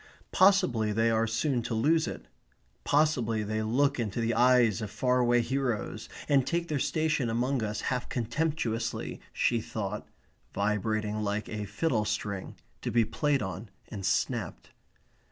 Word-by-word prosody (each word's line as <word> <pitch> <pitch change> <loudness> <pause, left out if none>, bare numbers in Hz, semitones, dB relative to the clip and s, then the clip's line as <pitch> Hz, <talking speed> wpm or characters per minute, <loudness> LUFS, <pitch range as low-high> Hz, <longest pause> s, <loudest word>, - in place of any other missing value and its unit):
Possibly 130 - +4
they 115 +2 +2
are 115 0 +2
soon 120 +3 0
to 115 0 -3
lose 155 +8 +2
it. - - -6 0.6
Possibly 125 -7 +2
they 110 +1 -2
look 135 +5 +1
into 115 -1 -2
the 115 0 +1
eyes 120 -2 +4
of 105 - -4
faraway 125 +1 +2
heroes, 125 -2 -2 0.2
and 140 -2 +4
take 170 0 -1
their 150 -2 0
station 155 -4 0
among 125 +3 0
us 105 0 -2
half 125 -1 -2
contemptuously, 120 -1 -2
she 120 -2 +1
thought 105 -1 -5 0.5
(vibrating 105 +1 0
like 105 0 -2
a 105 -1 -4
fiddle 110 0 0
string, 100 -2 -3 0.3
to - - -2
be 115 -1 +3
played 145 +2 0
on 95 +3 -6 0.2
and 100 -3 -6
snapped). 105 -1 -1
115 Hz, 145 wpm, -29 LUFS, 110-135 Hz, 0.6 s, Possibly